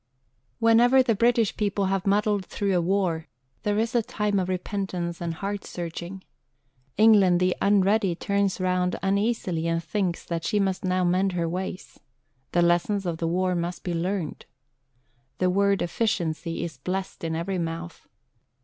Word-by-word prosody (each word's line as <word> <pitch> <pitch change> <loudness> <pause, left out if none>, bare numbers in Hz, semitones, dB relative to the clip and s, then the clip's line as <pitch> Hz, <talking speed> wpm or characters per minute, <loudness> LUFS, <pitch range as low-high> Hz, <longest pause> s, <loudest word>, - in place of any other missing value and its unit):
Whenever 240 +3 +5
the 240 -2 +2
British 230 0 +2
people 200 -1 0
have 195 0 -1
muddled 205 0 +2
through 200 -2 -1
a 175 - +3
war, 170 -3 0 0.3
there 205 0 0
is 230 +3 0
a 240 - +3
time 210 -2 -1
of 185 0 -2
repentance 180 -2 -3
and 170 -1 -3
heart 200 +3 -4
searching. 175 +2 -6 0.7
England 200 -5 +6
the 180 0 +2
Unready 200 -1 +3
turns 200 +1 0
round 180 0 +1
uneasily 195 -4 0
and 165 0 0
thinks 175 +1 -2
that 165 -1 -3
she 205 +4 +1
must 190 -2 0
now 185 0 +1
mend 185 +2 +2
her 170 -1 -1
ways. 185 +2 -5 0.5
The 175 - +3
lessons 175 +4 +1
of 170 -2 -2
the 165 - -1
war 180 +2 +1
must 175 0 -3
be 175 - -2
learnt. 175 -1 -3 0.9
The 185 0 +2
word 200 +1 +2
"efficiency" 170 -4 -1
is 160 -6 -6
blessed 185 +6 -4
in 160 -1 -2
every 180 +3 -2
mouth. 165 0 -5
185 Hz, 160 wpm, -25 LUFS, 175-200 Hz, 0.9 s, England